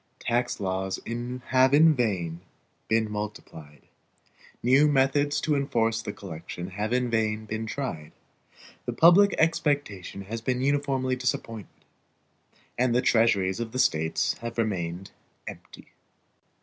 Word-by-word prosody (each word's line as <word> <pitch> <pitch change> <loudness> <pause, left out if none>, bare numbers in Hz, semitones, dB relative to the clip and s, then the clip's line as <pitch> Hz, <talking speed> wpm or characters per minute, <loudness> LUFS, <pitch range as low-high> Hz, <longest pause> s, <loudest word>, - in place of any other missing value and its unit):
Tax 120 0 -1
laws 95 -1 -2 0.5
have 130 +1 +4
in 160 +1 +6
vain 90 - -2 0.5
been 110 0 +2
multiplied; 95 -8 -7 0.8
new 135 +5 +5
methods 145 +1 +2
to 150 -1 0
enforce 115 -5 0
the - - -5
collection 90 -1 -8
have 105 +3 -3
in 125 0 +1
vain 110 -1 0
been 110 +1 -4
tried; 110 - -5 0.8
the - - -1
public 195 +4 +6
expectation 145 - -1
has 110 +4 -6
been 125 +1 -1
uniformly 135 -1 0
disappointed, 115 -4 -4 0.9
and 125 -1 +2
the 125 - +3
treasuries 110 -5 +2
of 115 -1 -5
the - - -3
States 80 -11 +1
have 115 0 -6
remained 95 -5 -2 0.3
empty. - - -11
115 Hz, 125 wpm, -26 LUFS, 100-130 Hz, 0.9 s, in